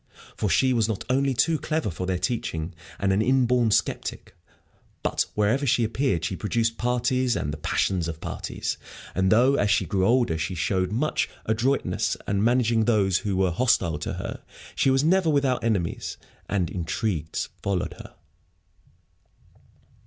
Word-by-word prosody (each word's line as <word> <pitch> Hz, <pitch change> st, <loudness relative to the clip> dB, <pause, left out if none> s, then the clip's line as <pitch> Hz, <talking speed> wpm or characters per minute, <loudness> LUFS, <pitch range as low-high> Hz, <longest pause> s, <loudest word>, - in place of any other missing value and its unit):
For 105 Hz, -, -1 dB
she 130 Hz, +9 st, +3 dB
was 115 Hz, -3 st, +2 dB
not 110 Hz, -3 st, -3 dB
only 135 Hz, 0 st, +2 dB
too 155 Hz, +6 st, +2 dB
clever 155 Hz, -, -1 dB
for 90 Hz, +3 st, -5 dB
their 95 Hz, -1 st, 0 dB
teaching, 90 Hz, -4 st, -2 dB, 0.2 s
and 95 Hz, -1 st, +1 dB
an 100 Hz, -, +2 dB
inborn 125 Hz, -1 st, +3 dB
sceptic, 105 Hz, -, -1 dB, 0.7 s
but -, -, 0 dB
wherever 105 Hz, +7 st, +2 dB
she 120 Hz, 0 st, +3 dB
appeared 110 Hz, -, 0 dB
she 95 Hz, -, -2 dB
produced 115 Hz, +3 st, 0 dB
parties 125 Hz, +1 st, +1 dB
and 75 Hz, -, -2 dB
the -, -, -5 dB
passions 85 Hz, +3 st, 0 dB
of 80 Hz, -1 st, -5 dB
parties. -, -, -4 dB, 0.3 s
And 95 Hz, 0 st, +1 dB
though, 125 Hz, +5 st, +5 dB
as 100 Hz, -, +2 dB
she 95 Hz, -, +3 dB
grew 95 Hz, -1 st, +1 dB
older, 120 Hz, -10 st, +2 dB
she 90 Hz, -, -2 dB
showed 90 Hz, +2 st, 0 dB
much 140 Hz, +8 st, 0 dB, 0.2 s
adroitness 120 Hz, +5 st, 0 dB
in 100 Hz, 0 st, +1 dB
managing 115 Hz, -1 st, +3 dB
those 100 Hz, -6 st, +3 dB
who 100 Hz, -3 st, -2 dB
were 95 Hz, -1 st, +2 dB
hostile 85 Hz, -7 st, +1 dB
to -, -, -4 dB
her, -, -, -6 dB, 0.3 s
she -, -, +2 dB
was 135 Hz, +1 st, +3 dB
never 175 Hz, +1 st, +3 dB
without 140 Hz, -4 st, +1 dB
enemies, 100 Hz, -7 st, -1 dB, 0.3 s
and 95 Hz, -5 st, 0 dB
intrigues 85 Hz, -1 st, -2 dB
followed 100 Hz, -3 st, -1 dB
her. -, -, -12 dB
110 Hz, 160 wpm, -25 LUFS, 95-125 Hz, 0.7 s, though